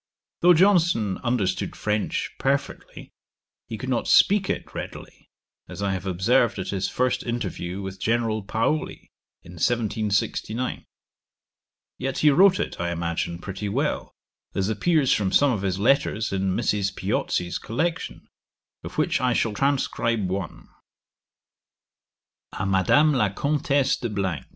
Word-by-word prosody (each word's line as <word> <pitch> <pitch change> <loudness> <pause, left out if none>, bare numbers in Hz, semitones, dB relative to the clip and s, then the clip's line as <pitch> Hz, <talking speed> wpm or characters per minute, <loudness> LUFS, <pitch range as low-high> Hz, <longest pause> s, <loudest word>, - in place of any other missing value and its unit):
Though 175 0 +6
Johnson 170 - +3
understood 105 -7 -1
French 105 0 -2
perfectly, - - -3 0.6
he 110 - -5
could 130 - -6
not 125 -3 -1
speak 200 -1 +4
it - - -3
readily, - - -9 0.4
as 90 +3 -6
I 100 - 0
have 95 0 -4
observed 110 +6 +2
at 95 - -4
his 95 -1 -1
first 125 0 0
interview 100 -5 -4
with 95 0 -7
General 115 0 0
Paoli, 115 +9 -2 0.3
in 85 - -13
1769; 110 +4 -1 1.1
yet 135 +1 -3
he 150 - +5
wrote 185 +5 +5
it, - - -3
I 85 - -1
imagine, 85 0 -2
pretty 95 +3 -5
well, - - -1 0.4
as 95 +1 0
appears 140 +6 +2
from 95 -3 0
some 145 -1 +4
of 105 -5 -2
his 95 -2 -1
letters 110 -1 +1
in 95 -1 0
Mrs. 100 -4 0
Piozzi's 90 0 -1
collection, 160 +9 -3 0.6
of - - -8
which - - +1
I 125 -1 +2
shall 115 -2 0
transcribe 115 -4 0
one: 95 -1 -5 1.9
_A 95 - -2
Madame 100 - +4
La 105 -7 +2
Comtesse 140 +3 +1
de 120 - -4
_. 95 - -2
110 Hz, 135 wpm, -24 LUFS, 95-130 Hz, 1.9 s, Though